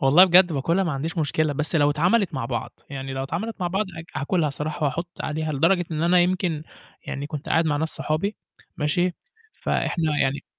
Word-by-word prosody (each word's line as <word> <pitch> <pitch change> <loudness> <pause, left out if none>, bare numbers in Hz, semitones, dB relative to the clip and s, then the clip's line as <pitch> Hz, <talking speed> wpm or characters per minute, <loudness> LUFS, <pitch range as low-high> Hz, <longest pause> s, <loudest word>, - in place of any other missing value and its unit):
والله 145 +8 +7
بجد 180 -1 +6
باكلها 165 +7 +1
ما 170 - -1
عنديش 160 +5 -3
مشكلة، 155 0 +1
بس 150 +4 +1
لو 145 -1 +4
اتعملت 180 +5 +2
مع 130 -3 -2
بعض، 120 -1 -4
يعني 135 -1 -5
لو 135 0 -3
اتعملت 175 +12 -3
مع 180 - 0
بعض 190 +4 0
ها 165 -3 -6
هاكلها 155 0 +1
صراحة 150 +2 -3
وأحط 170 +5 -2
عليها 155 0 -2
لدرجة 175 +6 +3
إن 155 0 -2
أنا 175 +1 +4
يمكن 175 -3 0 0.4
يعني 140 +1 -4
كنت 150 -1 -6
قاعد 165 - +3
مع 150 -2 +1
ناس 160 +2 -1
صحابي، 170 +9 -2 0.4
ماشي، 175 +4 +1 0.5
فإحنا 165 - 0 0.2
يعني 135 +1 -1
155 Hz, 195 wpm, -24 LUFS, 145-175 Hz, 0.5 s, والله